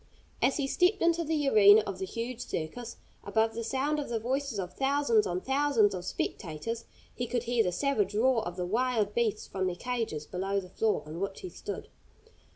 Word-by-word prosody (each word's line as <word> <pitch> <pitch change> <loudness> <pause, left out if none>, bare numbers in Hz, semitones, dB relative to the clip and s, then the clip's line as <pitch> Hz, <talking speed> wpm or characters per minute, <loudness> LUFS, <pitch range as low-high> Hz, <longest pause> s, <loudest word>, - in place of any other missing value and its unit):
As 275 - +3
he 285 - 0
stepped 360 +8 +2
into 335 0 +3
the 305 -2 0
arena 210 -3 +8
of 195 -2 -5
the 190 - -3
huge 235 +4 -4
circus, 225 +10 -5 0.3
above 225 0 +1
the 230 +1 -4
sound 275 +6 0
of 290 - -4
the 235 - 0
voices 265 +1 -2
of 180 -2 -4
thousands 270 -5 +2
on 180 0 -2
thousands 265 -6 +3
of 180 -1 -5
spectators 185 +5 -4 0.3
he 245 - -3
could 240 0 -1
hear 240 -1 +2
the 180 - 0
savage 210 -2 0
roar 240 +1 +3
of 175 -3 -5
the 180 -1 -2
wild 220 0 +1
beasts 220 -2 0
from 190 -1 -2
their 180 - -2
cages 225 -8 -3
below 195 +4 -1
the 185 -2 -9
floor 215 +3 0
on 155 +2 -7
which 195 0 -4
he 370 - -6
stood. - - -6
225 Hz, 200 wpm, -30 LUFS, 195-265 Hz, 0.3 s, arena